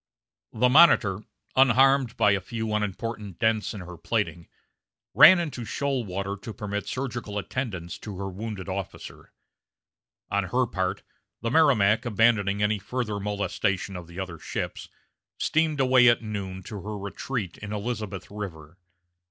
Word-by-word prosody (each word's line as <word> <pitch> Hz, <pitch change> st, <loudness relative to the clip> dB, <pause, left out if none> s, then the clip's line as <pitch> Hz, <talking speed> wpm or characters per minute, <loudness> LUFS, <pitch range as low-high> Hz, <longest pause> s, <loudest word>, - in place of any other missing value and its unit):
The 125 Hz, +3 st, +2 dB
Monitor, 125 Hz, -, +5 dB, 0.3 s
unharmed 135 Hz, +1 st, +5 dB
except 115 Hz, -, -19 dB
by 105 Hz, -, +4 dB
a 100 Hz, 0 st, +1 dB
few 110 Hz, -2 st, -4 dB
unimportant 105 Hz, -1 st, -3 dB
dents 110 Hz, -1 st, +1 dB
in 100 Hz, -, -6 dB
her 90 Hz, -1 st, -9 dB
plating, 85 Hz, -1 st, -2 dB, 0.7 s
ran 155 Hz, +7 st, +9 dB
into 150 Hz, -8 st, -3 dB
shoal 135 Hz, +3 st, -1 dB
water 100 Hz, +1 st, -3 dB
to 110 Hz, +2 st, -8 dB
permit 105 Hz, -1 st, -4 dB
surgical 120 Hz, -5 st, -4 dB
attendance 100 Hz, -6 st, -4 dB
to 105 Hz, -4 st, -8 dB
her 100 Hz, 0 st, -4 dB
wounded 100 Hz, 0 st, -6 dB
officer. 95 Hz, -1 st, -7 dB, 1.0 s
On 100 Hz, -1 st, +1 dB
her 125 Hz, +8 st, +1 dB
part, 95 Hz, -5 st, -2 dB, 0.4 s
the 115 Hz, -, -2 dB
Merrimac, 125 Hz, -9 st, +4 dB
abandoning 105 Hz, -3 st, +2 dB
any 105 Hz, 0 st, +1 dB
further 105 Hz, 0 st, -3 dB
molestation 100 Hz, -1 st, -2 dB
of 90 Hz, -2 st, -7 dB
the 85 Hz, +2 st, -9 dB
other 90 Hz, -4 st, -5 dB
ships, -, -, -5 dB, 0.5 s
steamed 155 Hz, -2 st, +1 dB
away 130 Hz, -2 st, +5 dB
at 120 Hz, -1 st, +4 dB
noon 95 Hz, -3 st, -5 dB
to 100 Hz, +1 st, -7 dB
her 105 Hz, +2 st, -5 dB
retreat 100 Hz, 0 st, -5 dB
in 105 Hz, -1 st, -7 dB
Elizabeth 105 Hz, -3 st, -4 dB
River. 90 Hz, -5 st, -8 dB
105 Hz, 145 wpm, -26 LUFS, 95-120 Hz, 1.0 s, ran